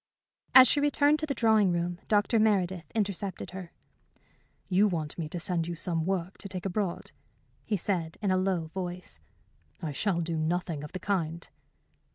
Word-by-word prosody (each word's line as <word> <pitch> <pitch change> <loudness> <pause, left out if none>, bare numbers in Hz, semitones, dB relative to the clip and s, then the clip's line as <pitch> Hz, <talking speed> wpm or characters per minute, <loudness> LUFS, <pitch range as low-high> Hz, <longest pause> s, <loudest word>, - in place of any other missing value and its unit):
As 260 -1 +11
she 290 - +3
returned 290 +1 +3
to 310 - -1
the 275 - -2
drawing 220 -5 +4
room, 175 0 -2
Dr. 210 +2 +3
Meredith 185 -6 +1
intercepted 200 -4 -2
her. 185 -2 -8 1.0
"You 195 +3 +4
want 160 -6 -3
me 160 -3 -4
to 175 - -5
send 170 -2 0
you 175 - -3
some 165 0 -1
work 190 -1 -2
to 200 - -6
take 185 -1 -5
abroad?" 195 -1 -2 0.5
he 210 - 0
said, 165 -3 -2
in 200 -2 0
a - - +3
low 185 -4 0
voice. 180 - -5 0.6
"I 155 - -4
shall 170 +4 0
do 165 0 -2
nothing 160 -1 -1
of 150 - -9
the 185 - -4
kind." 170 -4 -2
180 Hz, 175 wpm, -29 LUFS, 170-205 Hz, 1.0 s, As